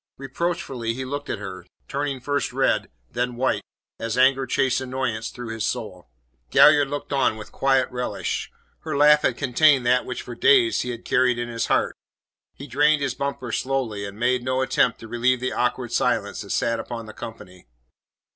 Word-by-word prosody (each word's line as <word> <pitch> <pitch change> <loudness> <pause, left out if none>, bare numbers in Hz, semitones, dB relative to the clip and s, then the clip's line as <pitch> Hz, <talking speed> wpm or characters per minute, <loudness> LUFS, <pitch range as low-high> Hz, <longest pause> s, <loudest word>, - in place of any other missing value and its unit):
Reproachfully 135 -4 -3
he 130 +1 -4
looked 145 +2 -5
at - - -2
her, 95 -3 -7 0.2
turning 140 -1 -2
first 145 +3 -1
red, - - +1 0.2
then 125 0 -2
white, 130 +2 0 0.4
as 115 +1 -3
anger 130 +1 +4
chased 130 +1 +1
annoyance 130 -4 -3
through 120 -2 -8
his 115 -1 -4
soul. - - -4 0.4
Galliard 145 - +6
looked 145 0 -5
on 130 -5 +2
with 105 -1 -10
quiet 135 -1 +2
relish; 125 0 -3 0.3
her - - -4
laugh 150 +1 +6
had 125 - 0
contained 140 0 +3
that 125 +1 +3
which - - -5
for - - -8
days 385 -6 +4
he 125 - -4
had 120 -1 -6
carried 125 -1 +2
in 120 0 -3
his 115 -1 -2
heart. - - +1 0.6
He 140 - -9
drained 145 +2 +2
his 135 -3 -1
bumper 140 -3 -4
slowly, 125 -7 -2
and 100 0 -7
made 125 +2 +1
no 130 +1 0
attempt 125 -2 +1
to 115 - -9
relieve 120 +2 +1
the 130 +1 -2
awkward 125 0 -1
silence 110 -5 0
that 100 - -10
sat 115 +2 0
upon 115 -2 -6
the 110 - -10
company. 90 - -10
125 Hz, 185 wpm, -24 LUFS, 115-135 Hz, 0.6 s, Galliard